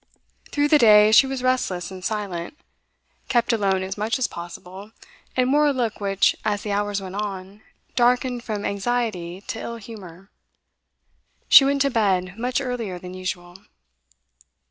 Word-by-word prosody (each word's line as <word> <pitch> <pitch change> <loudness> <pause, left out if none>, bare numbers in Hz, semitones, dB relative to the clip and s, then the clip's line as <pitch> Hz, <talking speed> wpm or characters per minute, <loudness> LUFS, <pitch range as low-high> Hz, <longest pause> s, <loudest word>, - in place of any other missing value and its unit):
Through 290 0 +1
the 300 - +5
day 215 -2 +7
she 265 +5 +7
was 265 -1 -4
restless 195 -9 -1
and 185 -1 -9
silent, 205 - -4 0.7
kept 240 -1 +1
alone 195 -4 +1
as 195 +2 -5
much 220 +4 0
as 260 - 0
possible, 180 +4 -9 0.4
and 255 +1 +2
wore 295 0 +4
a - - +3
look 235 -5 -2
which, 195 -1 +2
as 205 -1 -1
the 210 - -4
hours 205 0 -1
went 190 -1 -8
on, 200 0 -6 0.3
darkened 245 0 +1
from 210 -3 -4
anxiety 200 -4 -2
to 225 - -6
ill 235 - -5
humour. 195 -4 -12 1.2
She 270 - +9
went 280 0 +2
to 275 - 0
bed 190 -5 0
much 245 +4 -1
earlier 245 -8 -4
than 180 +1 -9
usual. 185 -1 -6
210 Hz, 155 wpm, -23 LUFS, 190-245 Hz, 1.2 s, She